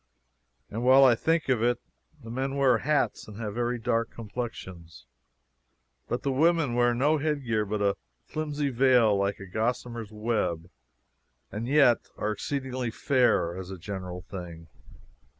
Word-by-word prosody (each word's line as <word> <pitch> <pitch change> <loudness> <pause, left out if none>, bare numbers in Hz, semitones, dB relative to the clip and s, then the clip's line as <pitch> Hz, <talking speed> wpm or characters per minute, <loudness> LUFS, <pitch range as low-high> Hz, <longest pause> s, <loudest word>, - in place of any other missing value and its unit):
And 115 +3 -3
while 130 +2 +7
I 130 -2 +7
think 160 +7 0
of 125 -4 +2
it 120 0 +2 0.4
the 115 - -8
men 135 +3 -2
wear 130 -4 +3
hats 150 +4 0
and 105 -1 -10
have 105 -3 -4
very 120 +1 -1
dark 115 -1 0
complexions, 95 - -7 1.0
but 120 - -3
the 140 - 0
women 160 -1 +2
wear 120 0 +3
no 145 +5 +2
headgear 135 -8 0
but 105 0 -1
a 100 -1 +1 0.3
flimsy 150 -2 -2
veil 125 -4 +4
like 100 0 0
a 95 - -8
gossamer's 115 +2 -3
web, 105 -6 -2 0.8
and 110 +3 -4
yet 135 -4 +4
are 105 - -1
exceedingly 130 +2 -3
fair 120 -8 +2
as 95 0 -7
a 95 - -6
general 90 -1 -6
thing. 85 -3 -9
120 Hz, 150 wpm, -27 LUFS, 100-130 Hz, 1.0 s, while